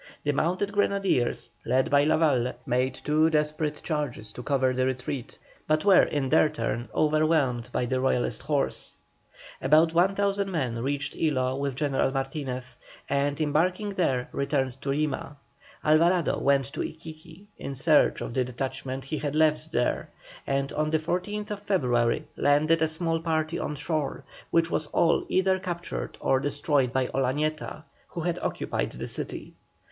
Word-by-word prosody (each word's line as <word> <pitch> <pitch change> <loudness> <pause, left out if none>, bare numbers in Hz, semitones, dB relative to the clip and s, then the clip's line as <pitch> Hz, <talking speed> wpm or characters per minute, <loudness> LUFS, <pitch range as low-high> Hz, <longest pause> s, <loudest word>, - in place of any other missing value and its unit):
The 145 - +2
mounted 180 +7 0
grenadiers, 195 -11 +1
led 130 0 +1
by 145 0 +5
Lavalle, 150 -6 +2
made 125 +1 0
two 155 +2 +2
desperate 150 -1 -1
charges 145 -9 -3
to 125 - -8
cover 130 -1 +1
the 130 0 +1
retreat, 130 0 -4 0.3
but 155 +2 +1
were 195 -3 +7
in 145 -3 0
their 155 - +5
turn 120 -4 -3
overwhelmed 155 -6 +2
by 125 - 0
the 130 +1 0
Royalist 125 -3 0
horse. 145 -2 -1 0.7
About 155 +4 +4
1,000 195 +3 +2
men 130 -10 -2
reached 140 +3 -2
Ilo 130 -5 0
with 140 -1 -2
General 140 -2 +1
Martinez, 135 -2 -4 0.3
and 140 +1 0
embarking 175 +7 +1
there, 150 -10 0
returned 135 -2 -1
to 140 - -4
Lima. 145 0 -2 0.5
Alvarado 165 +2 +3
went 140 0 +2
to - - -6
Iquiqui 160 +2 -8 0.2
in 140 - -5
search 150 +3 +3
of - - -4
the 130 - +2
detachment 130 +1 -4
he 150 +2 -4
had 145 +1 -3
left 155 0 +2
there, 125 -6 0 0.4
and 140 0 -1
on 155 0 0
the 160 - +2
14th 205 +6 -3
February 130 - +1
landed 155 +3 +3
a 160 - +4
small 165 +1 -1
party 160 0 -1
on 150 - -3
shore, 150 -1 -2 0.3
which 165 0 +2
was 155 - -1
all 165 +2 +2
either 190 0 +2
captured 175 -2 -5
or 135 - +2
destroyed 145 -2 +1
by 130 0 +1
Olañeta, 150 +4 -2 0.2
who 170 - -6
had 175 +1 -1
occupied - - -2
the - - -5
city. - - -6
150 Hz, 150 wpm, -27 LUFS, 130-160 Hz, 0.7 s, were